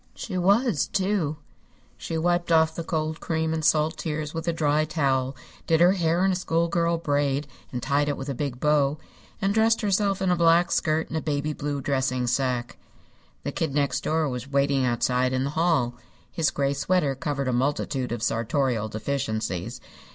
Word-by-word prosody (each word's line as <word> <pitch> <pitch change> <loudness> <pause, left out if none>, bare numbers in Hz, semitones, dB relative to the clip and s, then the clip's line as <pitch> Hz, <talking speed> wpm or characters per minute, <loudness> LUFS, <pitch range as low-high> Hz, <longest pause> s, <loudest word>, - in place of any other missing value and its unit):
She 195 - -6
was, 200 - +2
too. 185 -6 0 0.6
She 165 - -4
wiped 175 +1 0
off 160 -1 +4
the 170 - -5
cold 155 -1 -2
cream 160 -1 -1
and 160 -1 -2
salt 155 +1 +2
tears 155 -1 -3
with 165 +1 -5
a - - +3
dry 155 -2 +1
towel, 135 -4 0 0.3
did 160 -1 +3
her 175 +2 +6
hair 175 -1 +1
in 195 - +3
a - - 0
schoolgirl 170 -1 +1
braid 145 -2 0 0.3
and 125 -1 -4
tied 145 +1 +1
it 145 - -2
with 135 - -6
a 140 - -2
big 130 -1 -4
bow, 150 0 +2 0.4
and 200 -1 +1
dressed 225 +1 +3
herself 200 -1 +1
in 190 -1 +1
a - - +3
black 170 0 +4
skirt 155 0 +1
and 160 - -2
a - - -1
baby 150 0 -1
blue 145 -1 -3
dressing 130 -2 0
sacque. 125 -1 -1 0.6
The - - -3
Kid 150 -4 -2
Next 140 -3 0
Door 155 -1 +1
was 125 0 -5
waiting 140 -1 +2
outside 125 +1 +1
in 130 0 0
the 140 - -2
hall. 155 -7 +1 0.4
His 160 -3 +1
gray 140 0 0
sweater 145 0 +1
covered 140 0 -3
a 130 - 0
multitude 130 0 -1
of 120 -2 -3
sartorial 115 -1 0
deficiencies. 110 -2 -3
150 Hz, 185 wpm, -25 LUFS, 135-165 Hz, 0.6 s, her